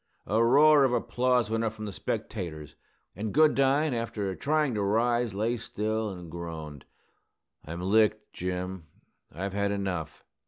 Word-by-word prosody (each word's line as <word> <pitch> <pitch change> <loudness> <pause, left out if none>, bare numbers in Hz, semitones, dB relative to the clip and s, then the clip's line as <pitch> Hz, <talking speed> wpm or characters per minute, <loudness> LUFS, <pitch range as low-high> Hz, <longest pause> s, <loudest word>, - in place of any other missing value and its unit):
A 110 +4 +2
roar 145 +4 +6
of 130 -2 +2
applause 125 -1 +1
went 115 0 0
up 110 -1 -1
from 110 -1 -7
the 105 - -4
spectators; 80 -4 -5 0.4
and 105 +3 -3
Goodine, 145 -1 +3
after 105 -5 -3
trying 150 +1 +1
to 105 - -1
rise, 115 +2 +1
lay 115 +4 0
still 110 0 -2
and 90 -4 -9
groaned, 80 -4 -7 0.8
"I'm 85 +3 -6
licked, 105 +2 +2
Jim. 90 -1 -4 0.4
I've 95 +5 -4
had 100 0 0
enough." 95 -5 -3
105 Hz, 145 wpm, -28 LUFS, 90-120 Hz, 0.8 s, roar